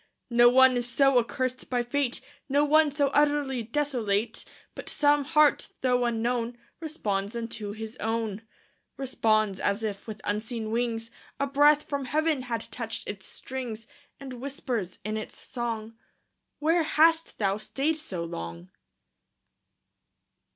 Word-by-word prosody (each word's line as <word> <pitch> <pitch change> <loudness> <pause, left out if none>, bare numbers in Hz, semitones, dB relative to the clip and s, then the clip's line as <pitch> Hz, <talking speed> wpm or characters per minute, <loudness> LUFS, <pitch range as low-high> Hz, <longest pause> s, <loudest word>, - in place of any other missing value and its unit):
No 240 0 +7
one 260 0 +6
is 245 0 -2
so 270 0 +4
accursed 255 +2 -2
by 245 -1 +1
fate, 255 +1 -1 0.3
No 285 +2 +3
one 310 +1 +5
so 285 0 +1
utterly 290 -3 +2
desolate, 230 -4 -1 0.3
But - - -5
some 290 -1 +3
heart, 300 0 +3
though 250 -1 +2
unknown, 235 +1 -1 0.2
Responds 215 - -2
unto 230 -3 -4
his 220 +2 -7
own. 220 -2 -2 0.6
Responds, 215 -7 +1
as 200 +2 0
if 205 -1 -4
with 215 -1 -6
unseen 220 +1 -3
wings, 230 -1 -1 0.3
An 280 0 0
angel 295 +1 +7
touched 300 - -14
its - - -29
quivering 255 -7 -2 0.6
strings; 220 +1 -16 0.3
And 270 -2 -7
whispers, 250 -8 -3
in 215 0 -2
its 215 - -7
song, 230 -2 -4 0.6
"'Where 325 +3 +3
hast 325 +1 +3
thou 200 -1 +1
stayed 285 +8 -1
so 190 - -4
long?" 85 - -7
240 Hz, 130 wpm, -27 LUFS, 220-280 Hz, 0.6 s, No